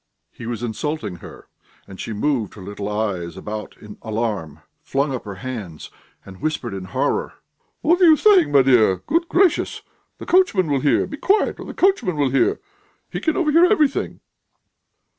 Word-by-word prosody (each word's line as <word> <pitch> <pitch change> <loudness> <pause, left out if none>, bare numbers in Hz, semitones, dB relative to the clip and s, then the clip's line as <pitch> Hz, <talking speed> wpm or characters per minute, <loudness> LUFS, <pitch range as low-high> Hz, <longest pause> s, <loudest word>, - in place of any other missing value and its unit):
He 115 - -9
was 120 -1 -4
insulting 115 - -4
her, - - -13 0.4
and 95 - -12
she - - -5
moved 110 -1 -1
her 105 - -11
little 100 +1 -6
eyes 100 -5 -3
about 105 0 -7
in 105 -2 -12
alarm, 105 -9 -3 0.2
flung 140 +1 -1
up 125 - -5
her 100 -2 -7
hands, 100 -7 -7 0.3
and 95 -1 -13
whispered 140 -8 -2
in 95 -1 -6
horror: - - -2 0.5
"What 345 +4 +2
are - - +7
you 315 -2 +7
saying, 395 -3 +5
my 140 -2 +5
dear! 120 -7 +4
Good 335 +3 0
gracious! 365 -2 +1 0.3
the - - -9
coachman 215 - +3
will 140 - +2
hear! 145 +2 +2
Be 295 - -8
quiet 405 +8 +1
or - - -7
the - - -8
coachman 365 - +2
will 140 -3 +1
hear! 135 -2 +2 0.5
He - - -3
can 315 -2 -1
overhear 335 +1 +4
everything." 310 -8 +1
130 Hz, 175 wpm, -21 LUFS, -, 0.5 s, are